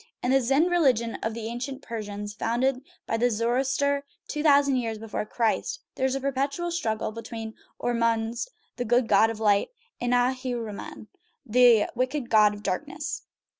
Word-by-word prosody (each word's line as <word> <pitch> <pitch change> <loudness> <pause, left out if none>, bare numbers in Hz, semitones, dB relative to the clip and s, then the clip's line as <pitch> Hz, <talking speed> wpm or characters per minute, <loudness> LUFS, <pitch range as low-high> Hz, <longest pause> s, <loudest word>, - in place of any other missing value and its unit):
In 250 - +1
the 270 0 +4
Zend 275 +8 +2
religion 255 -10 +3
of 220 0 -2
the 230 -1 -5
ancient 255 +4 -5
Persians, 210 -2 -5
founded 250 +5 0 0.2
by 225 - -1
Zoroaster 255 +5 +1 0.2
two 300 - -3
thousand 280 -3 +4
years 225 -3 -2
before 215 -1 -4
Christ, 240 - -1
there 260 - 0
is 265 - -1
a - - -1
perpetual 275 +5 -1
struggle 220 -12 -1
between 225 0 -7 0.3
Ormuzd, 230 - 0 0.3
the - - -1
good 240 +1 +3
god 225 - +5
of 225 -1 -5
light, 205 - +3 0.3
and 245 0 0
Ahriman, 245 -4 -2 0.4
the 235 -1 +5
wicked 255 +1 -2
god 210 -1 +5
of 205 - -11
darkness. 290 - -3
240 Hz, 155 wpm, -26 LUFS, 225-270 Hz, 0.4 s, god